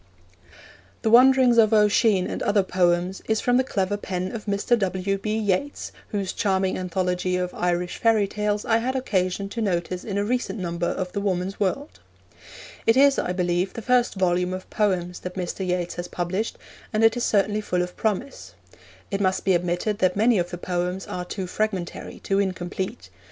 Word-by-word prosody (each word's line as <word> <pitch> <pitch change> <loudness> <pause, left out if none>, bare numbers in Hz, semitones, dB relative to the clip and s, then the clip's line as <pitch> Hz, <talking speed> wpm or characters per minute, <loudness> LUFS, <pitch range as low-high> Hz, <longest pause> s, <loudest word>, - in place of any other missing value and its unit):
The 220 - +2
Wanderings 250 0 +6
of 220 0 +5
Oisin 210 -2 +4
and - - -4
Other 205 -1 +2
Poems 180 0 +1
is 220 -1 +1
from 245 0 +2
the 260 - +3
clever 205 -4 -1
pen 185 -2 -4
of 225 -3 -6
Mr. 205 +4 +2
W. 195 0 -1
B. 215 +2 -2
Yeats, 215 +6 -1 0.2
whose 200 -3 -3
charming 190 -2 0
anthology 180 0 -1
of 180 0 -2
Irish 175 0 -1
fairy 220 -3 +3
tales 210 +1 -2
I 225 - +3
had 255 +3 -2
occasion 195 -6 -1
to 230 - -4
notice 180 -3 -1
in 200 -2 -3
a 205 - 0
recent 235 -3 -1
number 175 -2 -2
of 185 -1 -3
the 200 - -3
Woman's 190 -1 -2
World. 275 +10 -2 0.9
It 225 +2 +5
is, 280 +1 +5
I - - -1
believe, 180 +1 0
the 230 - -7
first 250 -1 +2
volume 180 -1 +1
of 185 - -8
poems 180 -4 0
that 180 0 -7
Mr. 180 0 -4
Yeats 180 -1 -1
has 175 0 -4
published, 185 +6 -3 0.3
and 215 0 +1
it 225 +1 +5
is 245 - -2
certainly 210 0 +2
full 180 -3 0
of 180 0 -7
promise. 220 +6 -3 0.6
It 200 0 -1
must 185 -1 0
be 190 - +4
admitted 175 +4 0
that 185 -1 +2
many 220 +1 +3
of 175 0 -1
the 175 - -6
poems 180 +1 -2
are 180 0 -5
too 190 +1 -4
fragmentary, 190 -2 -3
too 195 0 +1
incomplete. 190 +2 -3
195 Hz, 185 wpm, -24 LUFS, 180-215 Hz, 0.9 s, Wanderings